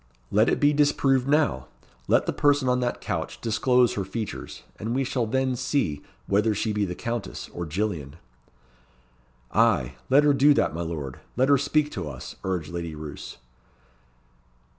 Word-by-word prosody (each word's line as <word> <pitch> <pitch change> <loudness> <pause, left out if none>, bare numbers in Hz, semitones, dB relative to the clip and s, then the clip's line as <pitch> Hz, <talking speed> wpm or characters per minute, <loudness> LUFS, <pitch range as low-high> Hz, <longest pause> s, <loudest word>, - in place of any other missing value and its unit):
"Let 110 +3 +4
it - - +1
be 145 0 +4
disproved 140 -3 +2
now. 140 - +1 0.4
Let - - +3
the - - -1
person 145 -2 +2
on 125 0 +2
that 125 -1 -2
couch - - -4
disclose 125 +2 +2
her 100 - -2
features, 105 +2 -6 0.2
and 115 +3 -2
we 135 - +1
shall 125 -3 -1
then 130 +2 0
see 120 - -1 0.2
whether 105 +2 +2
she 110 +1 -1
be 105 -1 0
the 90 -2 -5
Countess 115 -2 -5
or 85 -1 -4
Gillian." 80 -5 -3 1.4
"Ay, 60 -2 +2 0.2
let 140 +3 +6
her 145 -1 +5
do 140 +2 +5
that, - - +1
my 85 - -4
lord, 80 -6 -5 0.2
let 130 +2 +3
her 140 - +6
speak 150 +1 +1
to 90 -7 -4
us," 65 -3 -8
urged 90 -5 -2
Lady 85 -2 -5
Roos. 75 -1 -8
115 Hz, 165 wpm, -25 LUFS, 85-135 Hz, 1.4 s, let